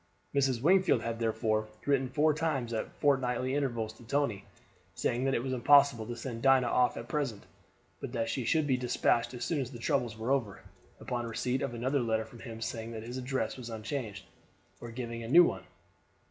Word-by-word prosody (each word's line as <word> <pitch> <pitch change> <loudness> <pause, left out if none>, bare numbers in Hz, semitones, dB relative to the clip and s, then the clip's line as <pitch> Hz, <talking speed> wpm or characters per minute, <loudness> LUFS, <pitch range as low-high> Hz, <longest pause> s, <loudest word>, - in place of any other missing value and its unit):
Mrs. 135 -3 +1
Wingfield 185 -8 +4
had 115 0 -3
therefore 110 -1 0 0.2
written 135 -2 +2
four 150 +4 +3
times 140 -7 -1
at 110 - -3
fort 140 -2 +3
nightly 125 +1 -1
intervals 120 -6 -1
to 115 - -16
Tony, 120 -5 -1 0.5
saying 125 +2 0
that 135 - +2
it 115 - -1
was 130 -1 -2
impossible 135 -2 +5
to 120 - -4
send 120 -2 -6
Dinah 135 -1 +5
off 125 +1 +2
at 115 - -6
present, 135 -9 -2 0.6
but - - -6
that 115 -2 -1
she 120 +3 -2
should 155 +6 +2
be 130 -3 +2
despatched 120 -1 +1
as 120 - -4
soon 155 -4 0
as 125 - -4
the 125 - -9
troubles 120 -3 -1
were 115 +4 -2
over, 115 -8 -1 0.4
upon 120 -1 -3
receipt 125 +3 -1
of 130 -3 -2
another 130 +4 0
letter 110 -2 0
from 115 +1 -14
him 115 -1 -8
saying 115 0 -4
that 110 -1 -6
his 120 +3 -6
address 130 +1 -2
was 120 -2 -7
unchanged, 110 -2 -5 0.5
or 120 - -8
giving 115 0 -5
a 115 - -6
new 170 +9 +8
one. - - -1
120 Hz, 200 wpm, -31 LUFS, 115-135 Hz, 0.6 s, new